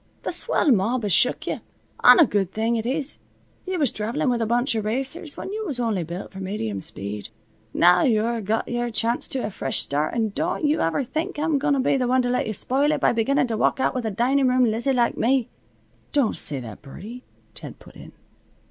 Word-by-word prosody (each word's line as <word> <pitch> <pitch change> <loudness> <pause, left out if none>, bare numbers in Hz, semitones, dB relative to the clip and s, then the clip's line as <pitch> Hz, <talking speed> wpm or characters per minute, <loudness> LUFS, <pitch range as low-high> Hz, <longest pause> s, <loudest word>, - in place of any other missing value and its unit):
Th' - - 0
swell 300 - +2
mob 230 +3 +1
has 205 -4 +1
shook 250 - +3
you, - - -3 0.4
an' - - +9
a 335 - +7
good 195 -6 -1
thing 225 +3 0
it 225 0 -2
is. 280 +2 -2 0.5
You 370 -1 -2
was 290 -5 +2
travelin' 245 +6 -1
with 235 -1 -1
a 225 - 0
bunch 240 +3 +1
of 220 -2 -2
racers, 270 - -2
when 390 - -6
you 435 +1 -3
was 275 -6 -4
only 220 -7 0
built 170 +4 -7
for 190 - -9
medium 115 - -4
speed. 100 +2 -7 0.4
Now 175 +5 +5
you're 230 -1 +1
got 215 +2 -1
your 240 0 -2
chance 230 +1 0
to 260 - -3
a 210 - -4
fresh 135 -7 -1
start 150 +7 -1
and 220 -3 -1
don't 335 +3 -1
you 300 +2 +2
ever 165 +11 0
think 315 +8 -4
I'm 300 -1 +1
going 290 0 +1
to - - 0
be 265 +1 +2
the 250 -2 0
one 255 +1 +2
to 245 - -1
let 250 - 0
you 215 - -2
spoil 275 +8 +1
it 305 - 0
by - - +3
beginnin' 250 +5 +1
to 225 -3 -3
walk - - +1
out - - +1
with 250 -3 -2
a - - 0
dinin' 255 +6 +2
room 250 0 +3
Lizzie 235 +5 0
like 240 -2 +1
me." 255 0 +1 0.6
"Don't 280 -6 +2
say 140 -3 -2
that, 115 -4 -9
Birdie," 210 - -10 0.3
Ted - - -9
put - - -17
in. - - -12
240 Hz, 230 wpm, -23 LUFS, 210-270 Hz, 0.6 s, an